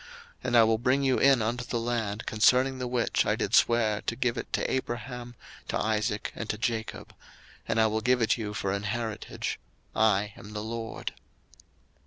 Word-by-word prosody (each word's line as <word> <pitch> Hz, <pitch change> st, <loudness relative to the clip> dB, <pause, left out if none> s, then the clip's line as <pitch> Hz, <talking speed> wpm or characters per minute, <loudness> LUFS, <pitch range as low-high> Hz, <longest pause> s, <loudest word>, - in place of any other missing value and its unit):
02:006:008 -, -, -16 dB, 0.4 s
And 120 Hz, -, +3 dB
I 115 Hz, -, +8 dB
will 110 Hz, 0 st, +3 dB
bring 130 Hz, +4 st, +2 dB
you 130 Hz, -2 st, +3 dB
in 135 Hz, -3 st, +5 dB
unto 120 Hz, +2 st, -1 dB
the 120 Hz, 0 st, -2 dB
land, 115 Hz, -3 st, -2 dB
concerning 130 Hz, +4 st, +3 dB
the 125 Hz, -, -2 dB
which 120 Hz, -1 st, +1 dB
I -, -, +1 dB
did -, -, -3 dB
swear 110 Hz, -3 st, +3 dB
to 115 Hz, -, -2 dB
give 125 Hz, -1 st, 0 dB
it -, -, -6 dB
to -, -, 0 dB
Abraham, 120 Hz, -1 st, -4 dB, 0.3 s
to -, -, -1 dB
Isaac, 105 Hz, -1 st, -1 dB
and 115 Hz, -, -6 dB
to 105 Hz, -, -1 dB
Jacob; 110 Hz, 0 st, -3 dB, 0.5 s
and 115 Hz, -, +1 dB
I 110 Hz, -, +5 dB
will 110 Hz, 0 st, 0 dB
give 125 Hz, +2 st, +3 dB
it 115 Hz, -, +3 dB
you 105 Hz, -3 st, -5 dB
for 100 Hz, -2 st, -1 dB
an 100 Hz, 0 st, -1 dB, 0.2 s
heritage: 110 Hz, -3 st, -4 dB, 0.4 s
I 105 Hz, -1 st, +2 dB
am 105 Hz, +1 st, -11 dB
the 105 Hz, 0 st, -4 dB
LORD. 115 Hz, 0 st, -5 dB
115 Hz, 195 wpm, -28 LUFS, 110-120 Hz, 0.5 s, I